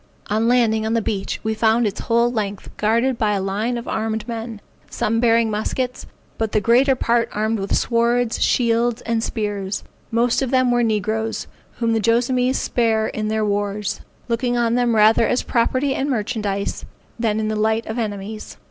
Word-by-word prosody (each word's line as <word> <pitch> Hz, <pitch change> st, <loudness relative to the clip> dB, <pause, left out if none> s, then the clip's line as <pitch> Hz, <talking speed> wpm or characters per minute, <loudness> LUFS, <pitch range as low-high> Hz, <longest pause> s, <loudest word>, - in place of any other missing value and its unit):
On 220 Hz, +2 st, +2 dB
landing 230 Hz, -3 st, +3 dB
on 220 Hz, +1 st, 0 dB
the -, -, +3 dB
beach, 200 Hz, -2 st, -2 dB
we 220 Hz, 0 st, 0 dB
found 225 Hz, +1 st, +2 dB
its 205 Hz, -1 st, -2 dB
whole 235 Hz, +1 st, +2 dB
length 205 Hz, -4 st, -4 dB
guarded 235 Hz, +4 st, +1 dB
by 210 Hz, -2 st, +2 dB
a 200 Hz, -, 0 dB
line 205 Hz, +6 st, -1 dB
of 235 Hz, -, -7 dB
armed 220 Hz, 0 st, -2 dB
men, 225 Hz, -2 st, -5 dB, 0.3 s
some 225 Hz, +1 st, 0 dB
bearing 230 Hz, -1 st, +3 dB
muskets, 245 Hz, +4 st, -3 dB, 0.3 s
but 220 Hz, -1 st, -1 dB
the 215 Hz, -, +4 dB
greater 250 Hz, +6 st, +4 dB
part 235 Hz, -1 st, +1 dB
armed 215 Hz, +1 st, 0 dB
with 195 Hz, 0 st, 0 dB
swords, 235 Hz, 0 st, +1 dB
shields, 235 Hz, 0 st, +2 dB
and 230 Hz, -1 st, 0 dB
spears; 205 Hz, -3 st, -3 dB, 0.3 s
most 235 Hz, +2 st, +1 dB
of 265 Hz, -, -1 dB
them 255 Hz, -1 st, +3 dB
were 240 Hz, 0 st, +2 dB
negroes, 220 Hz, 0 st, -1 dB, 0.3 s
whom 230 Hz, -1 st, +1 dB
the 225 Hz, -, +1 dB
Joassamees 250 Hz, +3 st, +2 dB
spare 225 Hz, -2 st, +1 dB
in 215 Hz, 0 st, -3 dB
their 215 Hz, 0 st, 0 dB
wars, 205 Hz, 0 st, -2 dB, 0.3 s
looking 240 Hz, +1 st, 0 dB
on 235 Hz, -1 st, +1 dB
them 240 Hz, -1 st, +2 dB
rather 220 Hz, +1 st, +5 dB
as 250 Hz, -, 0 dB
property 255 Hz, +3 st, +1 dB
and 275 Hz, +2 st, -1 dB
merchandise, 210 Hz, -4 st, -2 dB, 0.4 s
than 220 Hz, -2 st, 0 dB
in 215 Hz, -, -1 dB
the 215 Hz, -, -1 dB
light 220 Hz, +1 st, +1 dB
of 220 Hz, +2 st, -4 dB
enemies. 210 Hz, -1 st, -5 dB
225 Hz, 180 wpm, -21 LUFS, 215-240 Hz, 0.4 s, rather